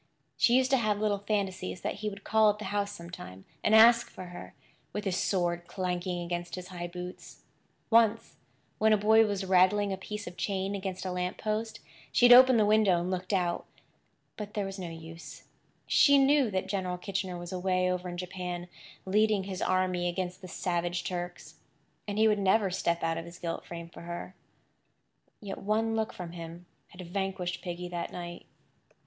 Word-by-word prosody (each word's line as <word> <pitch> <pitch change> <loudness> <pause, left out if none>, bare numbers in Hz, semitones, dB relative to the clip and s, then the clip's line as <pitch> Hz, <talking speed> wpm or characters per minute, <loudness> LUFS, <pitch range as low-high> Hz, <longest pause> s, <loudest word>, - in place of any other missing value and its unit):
She 240 - +4
used 260 +1 +3
to 270 - +5
have 215 -4 +1
little 210 -1 +1
fancies 195 -3 -2
that - - -3
he 210 +1 -2
would 200 -1 -10
call 220 -1 +4
at 205 - 0
the 215 - -7
house 205 0 0
sometime, 170 - -9 0.2
and 215 - +4
ask 235 +1 +7
for - - -9
her, - - -10 0.4
with 210 0 -4
his 190 -2 0
sword 175 -2 0
clanking 180 -1 -2
against 175 0 -4
his 180 -1 -8
high 175 -1 -5
boots. 180 +1 -9 0.5
Once, 225 -1 +3 0.4
when 220 0 +5
a - - +5
boy 220 +2 +5
was 200 -2 -2
rattling 190 +2 +3
a - - -3
piece 210 +2 -6
of 175 - -9
chain 195 -1 -1
against 190 -1 -4
a 185 - -2
lamp 180 0 -2
post 220 +1 -3 0.3
she 245 - +4
had 245 - +10
opened 255 -1 +8
the 210 - +4
window 210 -4 +4
and 175 +2 -2
looked 185 +1 -3
out. 175 -3 0 0.7
But 210 -1 -7
there 205 -2 -1
was 195 0 -6
no 180 -2 -5
use. 165 0 -10 0.4
She 285 -1 +6
knew 275 -2 +4
that 190 -2 -1
General 190 -2 -2
Kitchener 190 -1 -3
was 175 0 -7
away 185 0 +1
over 180 0 -3
in 175 - -6
Japan, 180 -1 -5 0.4
leading 210 +1 +2
his 190 -1 -5
army 185 -1 +1
against 180 0 -4
the 185 - -8
savage 175 0 -2
Turks; 175 -3 -6 0.5
and 205 0 -3
he 220 +1 +5
would 210 -1 +2
never 195 0 +3
step 170 -2 -1
out 165 0 0
of 165 - -7
his 170 +1 -11
gilt 170 -2 -4
frame 170 -1 -7
for 170 - -12
her. 175 +2 -6 1.1
Yet 200 -2 -6
one 220 +2 0
look 220 -1 -1
from 175 -2 -7
him 170 0 -9 0.2
had 180 - -12
vanquished 185 -1 -3
Piggy 180 0 -5
that 175 -1 -4
night. 175 -1 -7
185 Hz, 190 wpm, -29 LUFS, 175-210 Hz, 1.1 s, had